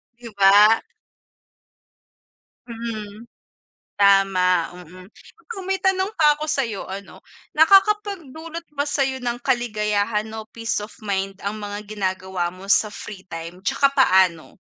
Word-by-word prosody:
'Di 235 -1 -11
ba? 205 +3 +7 1.9
Mm. 225 -1 -7 0.7
Tama, 190 -3 +3 0.2
mm. 185 +2 -14
Mm, 415 -6 -11
may 385 - +1
tanong 380 0 +2
pa 300 -2 +4
ako 305 - -4
sa'yo 260 -9 -2
ano, 195 +1 -9 0.3
nakakapagdulot 335 -3 +2
ba 290 0 -2
sa'yo 270 -2 0
ng 240 -1 -4
kaligayahan 210 -4 0 0.2
o 220 - -10
peace 230 -1 -3
of 210 +1 -8
mind 195 -1 -2
ang 210 +2 -3
mga 205 0 -6
ginagawa 190 -3 -3
mo 185 +2 -10
sa 215 - +4
free 205 -2 -9
time? 170 +2 -8
Tsaka 275 +8 +1
paano? 185 - +3
215 Hz, 125 wpm, -22 LUFS, 195-275 Hz, 1.9 s, ba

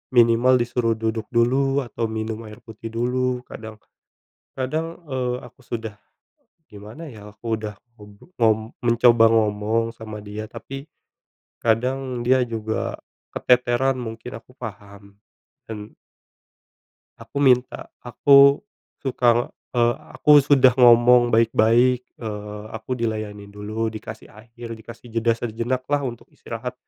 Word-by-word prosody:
minimal 120 +2 +5
disuruh 120 -1 0
duduk 110 0 -3
dulu 135 +4 +2
atau 115 -1 -3
minum 110 0 -4
air 105 0 -11
putih 110 0 -9
dulu. 125 +2 -1
Kadang 110 -1 -9 0.8
kadang, 160 +6 -3
eee, 125 -2 -1
aku - - -15
sudah 110 -3 -5 0.8
gimana 105 +10 -10
ya, 105 -1 -12
aku 115 0 -5
udah 105 -1 -6 0.2
untuk 105 - -16
ngom 110 0 +2
mencoba 120 -1 +5
ngomong 110 +1 +1
sama 110 -1 -8
dia. 105 +1 -6
Tapi, 135 +3 -8 0.8
kadang 125 +2 0
dia 130 +1 +4
juga 110 -1 -3 0.4
keteteran, 125 +1 +2
mungkin 115 0 -7
aku 125 +2 -22
paham 100 -3 -10 0.6
dan 105 -1 -8 1.3
aku - - -9
minta 130 -3 +2
aku 140 - +5 0.4
suka, 120 -3 +1 0.2
eee, 120 0 +3 0.2
aku 150 - +3
sudah 135 -2 +5
ngomong 120 -1 +6
baik-baik, 115 +2 +3 0.2
eee, 105 -2 -6
aku 110 +3 -4
dilayanin 110 -3 -4
dulu, 110 +2 -3
dikasih 110 0 -9
air, 115 +2 -12
dikasih 115 +1 -12
jeda 115 0 +2
sejenak 120 +3 -3
lah 145 0 +2
untuk 120 -4 -6
istirahat. 120 +2 -6
115 Hz, 120 wpm, -23 LUFS, 110-125 Hz, 1.3 s, ngomong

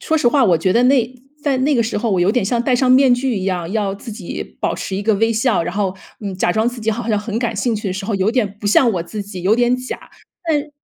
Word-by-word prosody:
说 320 - 0
实 245 -6 +3
话 270 -1 +3
我 175 -5 +4
觉 185 +3 +1
得 240 +2 +3
那 255 -2 +3 0.3
在 280 -3 +1
那 280 +2 +2
个 235 - +3
时 220 -1 -2
候 230 +1 -1
我 180 - +1
有 185 +3 +3
点 245 -6 +1
像 235 +3 0
戴 250 0 +1
上 255 +1 +2
面 260 0 +6
具 245 -2 -1
一 185 - -4
样， 180 -2 -2
要 205 -3 0
自 210 +2 -9
己 205 -5 -6 0.2
保 - - 0
持 190 - -5
一 200 - -3
个 220 +1 +2
微 225 +2 +2
笑， 225 -4 +1
然 175 - -4
后， 195 -2 -1 0.2
嗯， 200 -2 -4
假 175 - +1
装 220 +4 +1
自 245 -1 -7
己 220 - -4
好 230 +1 -4
像 210 -2 +2
很 215 +1 -4
感 235 -2 -1
兴 230 +2 0
趣 210 -1 -4
的 185 - -2
时 195 +1 -5
候， 215 - -2
有 195 +2 +1
点 210 -5 -1
不 - - -12
像 235 +4 +4
我 175 - -1
自 210 +5 -6
己、 195 -3 -8
有 210 +5 +3
点 245 +1 +2
假。 255 0 -6 0.5
但 300 -1 0
225 Hz, 320 characters per minute, -19 LUFS, 195-245 Hz, 0.5 s, 面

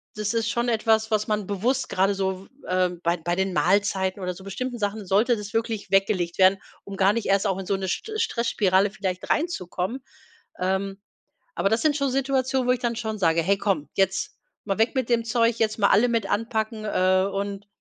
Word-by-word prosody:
das 210 0 -2
ist 230 0 0
schon 240 +1 0
etwas, 220 -1 +2
was 215 -1 +1
man 210 -2 -1
bewusst 240 +7 -1
grade 195 +2 +2
so, 190 0 -2
w - - -23 0.2
ähm, 180 -1 0
bei 170 +1 +2
d - - -19
bei 175 0 +1
den 190 0 -1
Mahlzeiten 190 0 +1
oder 180 0 -2
so 190 - -12
bestimmten 240 +6 -4
Sachen 205 0 -2
sollte 220 +6 +3
das 205 -1 -7
wirklich 225 -2 -2
weggelegt 195 -3 +1
werden, 190 +1 +6 0.3
um 200 - -8
gar 195 +1 +4
nicht 230 -1 -2
erst 195 +1 +2
auch 190 -1 0
in 190 - -5
so 200 - +1
'ne 190 0 -4
Stre 430 - -3
Stressspirale 205 - +1
vielleicht 185 -3 -4
reinzukommen. 245 - -2 0.6
Ähm, 190 +2 -1 0.6
aber 195 - +1
das 225 +2 +1
sind 305 -2 +3
schon 280 -2 0
Situationen, 265 -1 0
wo - - +4
ich 250 - -3
dann 240 -1 -1
schon 220 -2 -3
sage: 165 -2 +3
„Hey, 195 +4 +2
komm, 195 -7 -1
jetzt 190 0 0 0.3
mal 195 -2 -1
weg 225 +5 +2
mit 260 -3 -1
dem 235 -1 +2
Zeug, 230 0 +2
jetzt 215 -1 +1
mal 200 - +4
alle 215 +5 +5
mit 230 -4 0
anpacken, 220 0 -2
äh, 185 -2 +2
und“ 200 0 -4
205 Hz, 210 wpm, -25 LUFS, 190-230 Hz, 0.6 s, werden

